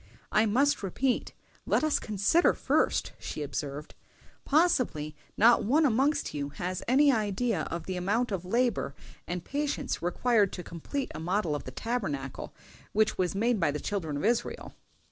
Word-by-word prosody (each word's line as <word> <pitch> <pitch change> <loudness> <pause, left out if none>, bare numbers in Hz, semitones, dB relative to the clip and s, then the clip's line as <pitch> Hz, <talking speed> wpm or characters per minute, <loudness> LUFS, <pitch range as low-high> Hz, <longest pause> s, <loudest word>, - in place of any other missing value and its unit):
"I 215 +1 +4
must 275 +7 +2
repeat, 240 +7 -1 0.3
let - - +2
us 310 -1 +2
consider 215 - +2
first," - - +1
she 150 - -5
observed. 145 +1 -5 0.5
"Possibly 250 - +2 0.2
not 235 +2 +6
one 295 +9 +3
amongst 270 +4 +1
you 145 -1 -3
has 180 +5 -4
any 280 +4 +5
idea 215 - 0
of 165 -1 -4
the 185 -1 -3
amount 210 +7 0
of 190 -3 -2
labor 230 - 0 0.3
and 175 -1 -4
patience 290 +1 -2
required 205 +3 +2
to 180 - -5
complete 255 - -5
a - - -6
model 175 0 0
of 145 - -4
the 130 - -6
Tabernacle 145 - -3 0.4
which 215 -1 +2
was 185 0 0
made 230 +2 +1
by 165 - +2
the 145 +1 -2
children 160 -7 -3
of 145 - -2
Israel." 235 +1 -1
205 Hz, 160 wpm, -29 LUFS, 165-245 Hz, 0.5 s, not